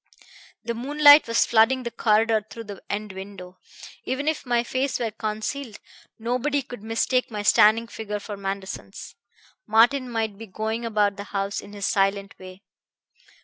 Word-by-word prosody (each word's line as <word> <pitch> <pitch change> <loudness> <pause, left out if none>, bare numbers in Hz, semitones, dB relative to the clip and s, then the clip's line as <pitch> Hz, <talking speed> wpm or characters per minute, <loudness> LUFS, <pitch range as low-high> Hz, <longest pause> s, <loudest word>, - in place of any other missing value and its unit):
The 235 - -3
moonlight 290 +4 +6
was 230 0 +3
flooding 240 +3 +3
the 235 - -4
corridor 220 0 +2
through 230 - -8
the 205 -3 -9
end 210 0 -3
window. 190 -1 -10 0.4
Even 260 +4 -3
if 315 -4 -1
my 240 -1 +2
face 260 +3 -1
were 230 -3 -2
concealed, 220 +3 -4 0.4
nobody 255 +5 -1
could 245 -4 -10
mistake 230 +3 0
my 210 -2 -5
standing 220 +2 +5
figure 220 -2 -5
for 205 0 -7
Manderson's. 195 -1 -6 0.5
Martin 245 +4 +4
might 220 -3 -3
be 225 - -8
going 220 +4 -3
about 210 -3 +1
the 200 - -6
house 200 0 -3
in 205 - -13
his 200 -1 -4
silent 195 0 0
way. 185 +1 -12
220 Hz, 155 wpm, -24 LUFS, 205-240 Hz, 0.5 s, moonlight